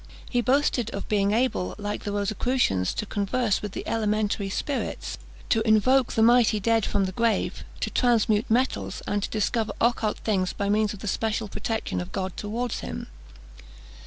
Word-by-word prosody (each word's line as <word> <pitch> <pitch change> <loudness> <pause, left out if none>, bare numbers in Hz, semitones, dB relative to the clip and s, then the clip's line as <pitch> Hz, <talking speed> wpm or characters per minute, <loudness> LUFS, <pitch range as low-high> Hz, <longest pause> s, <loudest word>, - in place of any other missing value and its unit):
He 245 - +1
boasted 255 -3 +2
of 200 - -5
being 200 -1 +2
able, 230 -4 0
like 205 0 -4
the 205 - -2
Rosicrucians, 205 - +1
to - - -2
converse 205 +1 0
with 205 -2 -5
the - - -5
elementary 210 -2 0
spirits; 275 +8 -3 0.3
to 225 - +3
invoke 230 +4 +3
the 220 - +3
mighty 235 -2 +5
dead 225 +1 +2
from 200 -2 +1
the 190 - -3
grave, 230 +3 0 0.2
to - - -1
transmute 225 -3 +2
metals, 250 +4 0
and 205 - -1
to - - -3
discover 220 +1 0
occult 230 -2 +1
things 190 -4 0
by 200 0 -2
means 210 0 +2
of 195 - -13
the 210 - -5
special 220 +2 -1
protection 210 - -3
of 90 +1 -7
God 185 - -3
towards 230 +3 -3
him. - - -6
215 Hz, 170 wpm, -26 LUFS, 200-235 Hz, 0.3 s, mighty